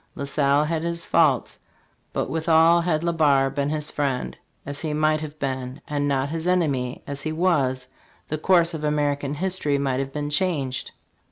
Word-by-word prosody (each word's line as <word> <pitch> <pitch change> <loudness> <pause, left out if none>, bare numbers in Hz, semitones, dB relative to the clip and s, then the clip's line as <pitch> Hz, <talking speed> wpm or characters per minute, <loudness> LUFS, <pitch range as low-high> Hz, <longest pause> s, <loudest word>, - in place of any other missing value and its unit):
La - - -5
Salle 140 +1 +2
had 160 +1 -1
his 170 0 -3
faults; 150 -7 +2 0.5
but - - -1
withal, 165 +1 +4
had 165 -2 0
Le 170 0 +1
Barre 140 -4 +3
been 140 +1 -1
his 150 -1 -3
friend, 135 -4 -2 0.3
as 145 0 -6
he 155 -2 -2
might 155 0 +2
have 155 -1 -7
been, 130 -1 -4
and 145 -1 -1
not 135 0 0
his 165 +2 -3
enemy, 140 -9 0
as 140 0 -5
he 155 - -3
was, 145 -7 +1 0.4
the 155 - -3
course 170 0 +3
of 155 -2 -5
American 145 -1 0
history 180 -4 -1
might 135 -2 0
have 135 0 -3
been 145 +1 -3
changed. 145 -7 -1
150 Hz, 180 wpm, -24 LUFS, 140-160 Hz, 0.5 s, withal